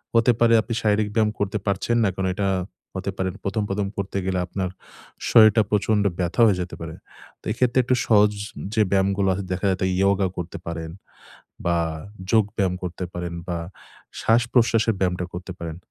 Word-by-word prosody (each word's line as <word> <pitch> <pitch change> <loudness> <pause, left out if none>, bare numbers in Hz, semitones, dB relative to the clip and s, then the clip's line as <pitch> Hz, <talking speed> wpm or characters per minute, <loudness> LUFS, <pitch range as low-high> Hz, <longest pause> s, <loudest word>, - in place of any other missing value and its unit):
হতে 115 +2 +5
পারে 115 0 +5
আপনি 115 +2 -5
শারীরিক 105 0 +2
ব্যায়াম 110 -2 +3
করতে 100 +1 0
পারছেন 100 +4 +1
না। 100 - +3
কারণ 95 0 -1
এটা 100 0 0 0.5
হতে 95 +1 -2
পারে 95 0 0 0.2
১ম, 105 +2 0
১ম 100 0 -1
করতে 100 0 -3
গেলে 95 -1 0
আপনার 95 -2 -3 0.6
শরীরটা 110 -1 +7
প্রচন্ড 105 0 +2 0.2
ব্যথা 90 +6 0
হয়ে 95 -4 +3
যেতে 90 - -5
পারে। 80 -1 -6 0.5
তো - - -23
এক্ষেত্রে 125 +3 +2
একটু 125 +1 +2
সহজ 105 -1 +5 0.4
যে 110 - +4
ব্যায়ামগুলো 100 0 +2
আছে। 100 - -3
দেখা 90 +2 -3
যাতে 95 0 -1
ইয়গা 100 0 +3
করতে 90 0 -5
পারেন 80 -1 -4 0.8
বা 85 0 +2 0.5
যোগ 110 -2 +5
ব্যায়াম 95 -3 +1
করতে 90 0 -4
পারেন 85 -1 -4
বা 85 -1 -1 0.6
শ্বাসপ্রশ্বাসের 115 -1 +3
ব্যায়ামটা 90 -1 0
করতে 90 +2 -6
পারেন। 80 -2 -5
100 Hz, 170 wpm, -23 LUFS, 90-110 Hz, 0.8 s, শরীরটা